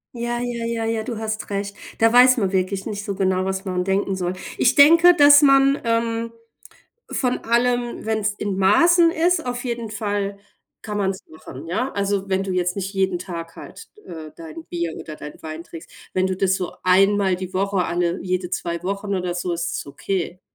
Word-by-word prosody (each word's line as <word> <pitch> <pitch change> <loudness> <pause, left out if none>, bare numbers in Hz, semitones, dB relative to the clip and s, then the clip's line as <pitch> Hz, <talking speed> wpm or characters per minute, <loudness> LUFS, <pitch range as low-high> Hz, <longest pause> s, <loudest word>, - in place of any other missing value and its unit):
Ja, 240 0 -2
ja, 240 -1 -3
ja, 230 -1 -2
ja, 225 -1 -1
du 230 0 -5
hast 220 -1 -4
recht. 200 0 -3 0.2
Da 225 0 +3
weiß 255 +1 +7
man 195 -4 0
wirklich 190 0 -1
nicht 205 -2 -5
so 200 -1 -4
genau, 185 -1 0
was 190 +1 -3
man 180 -1 -1
denken 195 0 0
soll. 180 -1 -2 0.3
Ich 255 - +3
denke, 335 +5 +7
dass 290 -1 +8
man, 275 0 +5
ähm, 230 0 -1 0.8
von 250 -2 0
allem, 240 0 0
wenn's 215 -2 0
in 200 -2 -3
Maßen 335 - +5
ist 340 -1 +1
auf 245 0 -4
jeden 235 -3 -4
Fall 205 -2 -3 0.4
kann 210 -1 -5
man's 195 -1 -2
machen, 155 -2 -11
ja? 220 +11 -2
Also, 200 -1 -1
wenn 190 0 0
du 195 - -4
jetzt 180 -1 0
nicht 195 0 -4
jeden 190 -2 0
Tag 170 -3 -7
halt, - - -11 0.2
äh, 155 -2 -9
dein 165 0 -10
Bier 170 -2 -3
oder 155 - -8
dein 150 0 -10
Wein 160 +1 -7
trinkst, 165 -1 -11 0.2
wenn 185 0 +1
du 190 - -2
das 190 0 +1
so 180 -2 -4
einmal 195 0 +3
die 185 0 -7
Woche 195 -1 0
alle 175 0 -1
jede 180 -1 -2
2 170 -1 -3
Wochen 200 +1 -2
oder 180 -1 -2
so, 175 0 -2
ist 170 -1 -3
es - - -6
okay, 180 +4 -4
195 Hz, 195 wpm, -22 LUFS, 185-230 Hz, 0.8 s, dass